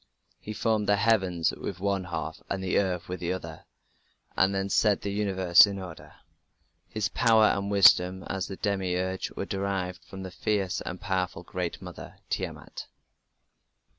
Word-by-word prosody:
He 110 - -8
formed 110 -1 0
the 105 - +5
heavens 95 -6 +2
with 95 - -6
one 100 -1 -1
half 90 - -5
and 95 -1 -2
the 95 - +2
earth 90 -3 -1
with 90 +1 -5
the 85 0 -2
other, 80 -4 -6 0.7
and 95 +1 +3
then 95 0 -1
set 105 0 +2
the 100 - -2
universe 95 -3 +5
in 100 -1 -4
order. 90 -4 -9 0.7
His 110 -2 -1
power 115 -1 +4
and 100 -1 +1
wisdom 95 -2 +5
as 95 +1 -3
the 95 - -6
Demiurge 95 -2 -1
were - - -4
derived 95 -2 -3
from 95 -1 -9
the 95 - -7
fierce 100 -1 -1
and 90 - -6
powerful 90 -3 -2
Great 90 -1 -4
Mother, - - -10
Tiamat. - - -5
95 Hz, 160 wpm, -28 LUFS, 90-100 Hz, 0.7 s, the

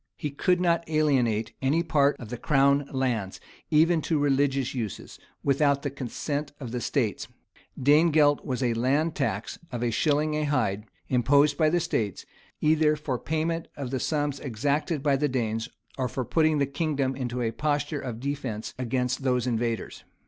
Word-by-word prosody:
He 150 - -3
could 180 +5 +1
not 170 -2 +2
alienate 130 -9 +1
any 145 +6 +2
part 145 -3 +2
of 115 - -9
the 125 - -5
crown 140 -1 +3
lands, 120 -8 -1 0.3
even 160 +1 +4
to 160 +1 0
religious 140 -2 +1
uses, 115 -6 -5 0.2
without 140 0 +2
the 140 - -2
consent 140 +2 -4
of 125 -5 -6
the 125 0 -3
states.[] 115 -8 -1 0.5
Danegelt 145 +1 +4
was 130 -2 -2
a 120 -2 +2
land 140 +8 +1
tax 115 -9 -2
of 120 -1 -3
a 120 - +1
shilling 150 +8 +1
a 155 0 0
hide, 110 -8 0 0.2
imposed 140 +4 +3
by 155 -2 +3
the 175 +2 +2
states,[] 110 - -2 0.4
either 155 0 +3
for 145 -5 -3
payment 165 +1 -2
of 135 -3 -5
the 130 - -1
sums 145 -2 -1
exacted 140 +4 -1
by 140 -2 +3
the 150 +1 0
Danes, 115 -2 -2 0.3
or 130 - +1
for 130 0 -3
putting 155 +1 +2
the 140 - +2
kingdom 140 -2 -1
in 125 -2 -4
a 115 -2 0
posture 145 +3 -1
of 120 -4 -5
defence 130 -5 -4
against 125 +1 -1
those 125 -2 +1
invaders. 115 -2 -2
140 Hz, 170 wpm, -27 LUFS, 125-150 Hz, 0.5 s, even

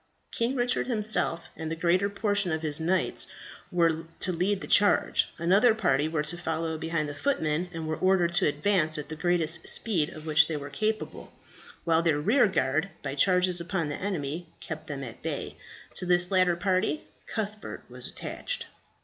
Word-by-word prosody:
King 235 +3 -1
Richard 245 -1 0
himself 215 -7 0
and 160 0 -5
the - - -1
greater 180 +4 +2
portion 205 -2 +1
of 160 0 -2
his 150 -1 -1
knights 180 +4 0 0.4
were 165 -2 +1 0.2
to 185 - +1
lead 190 +3 0
the - - -5
charge; 205 0 +4
another 195 +7 +4
party 145 -8 +2
were 160 -1 -1
to 170 +3 -1
follow 160 -1 -2
behind 160 -1 -2
the 145 - -5
footmen, 160 - 0
who 165 -2 -7
were 155 0 -2
ordered 185 -2 +3
to 175 - +4
advance 155 +1 +2
at 150 0 -6
the 160 - -5
greatest 170 -1 0
speed 175 -10 0
of 155 0 -10
which 155 -1 +5
they 160 - -2
were 145 0 -7
capable, 215 0 -3 0.5
while 165 -1 +3
their 160 -3 +2
rearguard 180 - +2
by 135 -2 -3
charges 180 +3 +3
upon 170 -3 -2
the 145 - -5
enemy, 170 -4 -3
kept 160 -1 -7
them 140 -2 -5
at 120 -3 -9
bay. - - -4 0.4
To 180 - +1
this 180 +1 +4
latter 185 -2 +3
party 185 -4 0 0.2
Cuthbert 215 -1 -5
was - - -5
attached. - - -4
170 Hz, 175 wpm, -28 LUFS, 155-190 Hz, 0.5 s, which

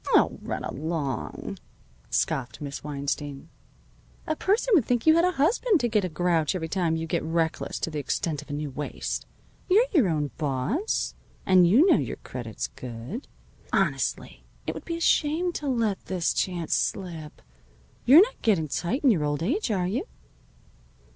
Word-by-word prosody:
"Oh, - - +3
run - - -4
along!" 150 -2 -4 0.5
scoffed 125 -2 -1
Miss 140 -1 -6
Weinstein. 145 0 -4 0.8
"A 315 - -1
person 430 +9 +1
would 325 -10 +6
think 240 +1 0
you 315 - +7
had 335 +1 +4
a 365 - +2
husband 375 - +2
to 240 - +2
get 215 -3 +1
a 185 - -1
grouch 170 0 +1
every 160 -3 -3
time 170 -2 +1
you 165 0 -2
get 165 +1 -1
reckless 165 0 -1
to 165 - -1
the 150 - -3
extent 145 +2 -2
of - - -16
a - - -4
new 145 -1 -3
waist. 145 +3 -4 0.4
You're 420 +7 +6
your 265 - +4
own 150 -3 -1
boss. 155 - -1 0.3
And 185 -2 +6
you 240 - +6
know 360 -5 +6
your - - -3
credit's 120 -4 -5
good. 125 - -7 0.4
Honestly, - - -1 0.2
it - - -2
would - - -9
be 335 -1 -3
a - - -8
shame 335 +2 +2
to 295 - -4
let 230 -6 0
this 180 -3 0
chance 175 -3 -1
slip. 165 -6 -2 0.6
You're 300 +9 +9
not - - -5
getting 175 -9 +2
tight 210 - -1
in 270 - +6
your 165 -8 +1
old 145 +1 -1
age, 290 - 0
are 190 -4 +1
you?" 240 - -2
180 Hz, 175 wpm, -26 LUFS, -, 0.8 s, You're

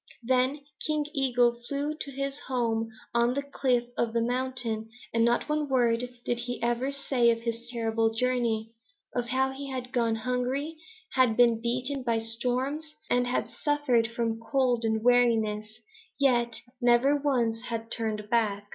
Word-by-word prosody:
Then 260 +4 +2 0.3
King 305 -1 0
Eagle 245 -4 +2
flew 285 +2 -1
to 295 - -1
his 275 +1 -3
home 230 -3 0 0.2
on 235 +1 +2
the 280 - -1
cliff 260 -3 +1
of 230 -1 0
the 230 - +2
mountain, 245 -3 -2 0.2
and 230 0 +3
not 235 +1 +2
one 300 -1 -1
word 245 -2 +2 0.2
did 240 - 0
he 245 0 -4
ever 240 +3 0
say 275 -4 +2
of 230 0 +1
his 230 0 -4
terrible 225 -1 0
journey, 225 -2 0 0.4
of 245 -1 -1
how 265 +2 +1
he 275 +1 -7
had 255 -1 -5
gone 230 -2 +2
hungry, 250 +6 -2 0.4
had 255 -4 +3
been 235 -2 +5
beaten 255 +4 -1
by 235 -2 +1
storms, 255 +7 -1 0.2
and 245 0 +3
had 250 - 0
suffered 290 -6 +1
from 230 -1 -2
cold 245 -1 +1
and 220 0 0
weariness, 225 -3 +3 0.5
yet 240 -4 +3 0.3
never 245 +4 +4
once 245 -6 0
had 230 -1 -4
turned 215 -2 -3
back. 205 -3 0
245 Hz, 155 wpm, -28 LUFS, 230-265 Hz, 0.5 s, been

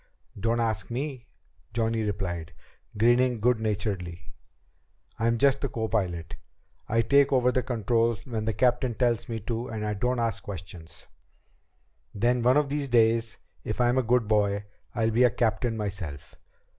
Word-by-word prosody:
"Don't 115 +3 +1
ask 115 -2 -1
me," 130 0 -4 0.5
Johnny 115 0 0
replied, 85 -6 -3 0.4
grinning 120 +2 +3
good 120 +1 +2
naturedly, 100 -5 -3 0.9
"I'm 115 +1 +2
just 140 +1 +3
the 140 - -1
copilot. 95 -8 -2 0.5
I 115 +1 +2
take 140 +4 +4
over 125 -2 +3
the 130 - +1
controls 115 -2 0
when 110 -4 -3
the 110 - 0
captain 125 +1 +1
tells 120 -1 0
me 115 -1 -3
to 115 +3 -3
and 110 -3 -4
I 105 - -1
don't 125 +5 0
ask 115 -4 -1
questions. 85 -4 -9 1.1
Then 120 +4 +2
one 125 +3 +4
of 150 -2 +2
these 145 -1 -2
days, 115 -1 +3 0.3
if 110 - -4
I'm 125 +1 +3
a - - +3
good 120 -2 +2
boy, 105 -1 +1 0.3
I'll 115 -1 +1
be 120 +3 +3
a 125 - +6
captain 120 0 0
myself. 95 -9 -5
115 Hz, 155 wpm, -27 LUFS, 105-125 Hz, 1.1 s, a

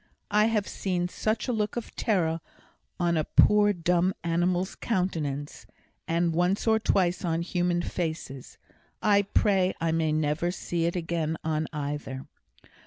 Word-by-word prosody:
I 210 +1 +4
have 215 -3 +1
seen 180 -2 -2
such 215 +5 -1
a 250 - 0
look 210 -2 -1
of 240 - -6
terror 165 -7 0 0.6
on 170 -1 +2
a 155 - +2
poor 210 +5 +5
dumb 180 0 +1
animal's 175 +2 0
countenance, 155 -9 -2 0.4
and 170 0 +1
once 180 +4 +1
or 220 -1 +4
twice 185 -4 +1
on 165 -1 0
human 175 -1 0
faces. 160 -7 -5 0.5
I 205 -1 +5
pray 195 -2 +2
I 165 0 0
may 160 -1 +1
never 155 +2 0
see 175 -1 -2
it 170 - -1
again 165 -2 -1
on 155 -1 -1
either! 145 -2 -4
175 Hz, 145 wpm, -27 LUFS, 160-195 Hz, 0.6 s, poor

